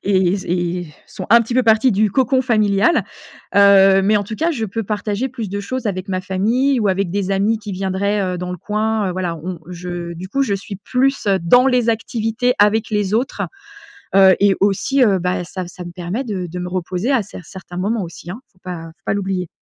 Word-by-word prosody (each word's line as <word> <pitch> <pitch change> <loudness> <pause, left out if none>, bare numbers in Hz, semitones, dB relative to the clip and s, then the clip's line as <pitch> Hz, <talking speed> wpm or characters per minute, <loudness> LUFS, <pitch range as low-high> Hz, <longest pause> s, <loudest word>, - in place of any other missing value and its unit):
et 190 -1 +2
z 190 - -7
et 175 0 -1 0.2
sont - - -8
un 235 +1 +8
petit 235 +1 -3
peu 255 - +4
partis 225 +2 +4
du 210 +1 +2
cocon 260 +3 +2
familial. 215 +2 +2 0.5
Heu, 195 -1 +6
mais 210 +2 +3
en 205 - 0
tout 215 - -6
cas 325 +9 0
je 245 -9 -2
peux 220 +2 -3
partager 210 +3 -2
plus 235 -5 -6
de 200 +2 -4
choses 255 +4 -4
avec 190 -1 -3
ma 185 -1 -1
famille 230 +9 +1
ou 210 - +1
avec 190 -1 0
des 195 -1 -1
amis 200 +3 +1
qui 210 -1 -8
viendraient, 195 +2 -1
heu, - - -5
dans 180 0 -4
le 180 - -4
coin, 215 +1 -1
heu, - - -3
voilà 180 -2 -3
on 175 +2 -6
je, 175 -1 -6
du 180 +3 -8
coup, 275 +7 0
je 210 -7 0
suis 200 +1 -6
plus 255 +4 0
dans 245 +10 +5
les 250 -3 +1
activités 225 +2 0
avec 215 +2 +3
les 210 -1 0
autres, 245 +4 -1 0.7
heu, 190 -1 +7
et 200 -1 +4
aussi, 205 +7 +2
heu, 200 -5 +3
bah, 180 0 -1
ça 180 +1 -6
ça 180 0 -9
me 175 - -7
permet 180 +8 -4
de 195 -7 -4
de 180 +2 -6
me 180 - -4
reposer 185 +6 -2
à 260 -4 +3
cer 200 -2 -10
certains 185 -1 -10
moments 205 +3 -1
aussi, 170 0 -9
hein 210 - -7
faut 185 - -31
pas 175 -3 -6
faut 195 - -46
pas - - 0
l'oublier. 190 -2 -2
200 Hz, 225 wpm, -19 LUFS, 185-225 Hz, 0.7 s, un